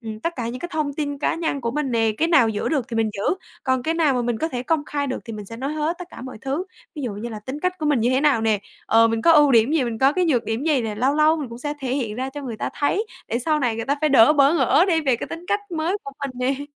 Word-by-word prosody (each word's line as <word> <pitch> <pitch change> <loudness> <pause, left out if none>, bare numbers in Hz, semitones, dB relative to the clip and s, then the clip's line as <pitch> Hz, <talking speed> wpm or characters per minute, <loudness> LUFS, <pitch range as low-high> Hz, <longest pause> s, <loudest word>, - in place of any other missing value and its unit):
ừm, 220 -1 -7
tất 335 - -2
cả 235 -2 -3
những 250 +2 -5
cái 350 - -4
thông 300 -2 -1
tin 285 -2 -3
cá - - 0
nhân 320 -4 -2
của 230 -1 -2
mình 285 -1 -2
nè, 225 -2 +2
cái 325 - +2
nào 265 -9 +5
giữ 210 -1 -2
được 275 -6 -1
thì 230 - -4
mình 220 -1 +1
giữ, 200 - -5 0.4
còn 260 -1 +1
cái 325 +4 0
nào 280 -7 +2
mình 235 -2 -1
có 320 - -1
thể 245 -3 -4
công 300 +1 0
khai 285 -1 -2
được 260 - -3
thì 230 - -7
mình 210 -1 -7
sẽ 230 - -8
nói 275 +4 -3
hết 310 +3 -2
tất 360 - -6
cả - - -10
mọi 260 -3 -8
thứ. 275 +7 -2 0.3
Ví 295 - -6
dụ 235 -5 -3
như 215 +4 -5
là 220 - -6
tính 260 +8 -7
cách 365 0 -1
của 305 - -2
mình 290 -5 +2
như 240 +3 +2
thế 260 +1 +2
nào 290 -6 +3
nè, 220 -2 +2 0.3
ờ, 230 0 +5
mình 225 0 -1
có 330 - +6
ưu 295 -3 +6
điểm 230 +5 +4
gì, 300 -6 +2
mình 225 -2 -3
có 270 +2 +4
cái 365 +1 +1
nhược 260 -8 +1
điểm 225 +6 -2
gì 300 -5 +2
nè. 215 -2 -3
Lâu 260 +6 +1
lâu 310 +1 +4
mình 285 -6 -4
cũng 235 +1 -9
sẽ 295 +2 -4
thể 260 -1 -2
hiện 230 -7 -2
ra 260 +1 -3
cho 290 +1 -7
người 235 -5 -5
ta - - -3
thấy 395 +10 0 0.2
để 235 - -1
sau 300 +4 0
này 235 -4 0
người 225 - -3
ta 280 +3 0
phải 305 - +2
đỡ 265 0 +6
bỡ 285 +2 +4
ngỡ 300 +4 +4
đi 330 -3 +3
về 265 -6 +1
cái - - -5
tính 330 +2 -8
cách 410 - 0
mới 335 +4 -1
của 275 - -7
mình 275 - -3
nè. 265 +3 -1
270 Hz, 330 wpm, -22 LUFS, 235-305 Hz, 0.4 s, có